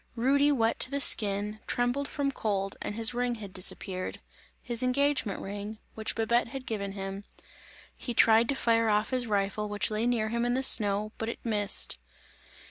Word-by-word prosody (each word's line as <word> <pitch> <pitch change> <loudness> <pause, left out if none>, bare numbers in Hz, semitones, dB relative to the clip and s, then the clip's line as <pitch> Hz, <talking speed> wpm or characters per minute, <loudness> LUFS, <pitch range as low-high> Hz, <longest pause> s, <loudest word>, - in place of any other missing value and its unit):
Rudy 280 +5 +3
wet 230 -5 +1
to - - +6
the 280 +1 -2
skin, 210 -4 +3
trembled 245 +4 -1
from 280 -1 -2
cold 195 -6 -2
and 205 - -5
his 230 +2 +1
ring 245 0 -1
had 205 -4 -10
disappeared, 185 0 0 0.4
his 240 -1 -4
engagement 255 -4 0
ring, 205 +2 -6 0.2
which 220 0 -5
Babette 235 +2 +1
had 260 +2 -8
given 200 -3 -4
him. 195 0 -6 0.7
He 240 - -6
tried 225 +1 +5
to 280 - 0
fire 230 -3 +2
off 210 +3 +1
his 250 -2 -1
rifle 205 0 -1
which 205 +1 0
lay 215 +2 -1
near 225 -3 0
him 235 +1 -1
in 245 0 0
the 265 - 0
snow 210 -3 +3
but 225 - -3
it - - -5
missed. 205 - +1
225 Hz, 180 wpm, -28 LUFS, 205-245 Hz, 0.7 s, to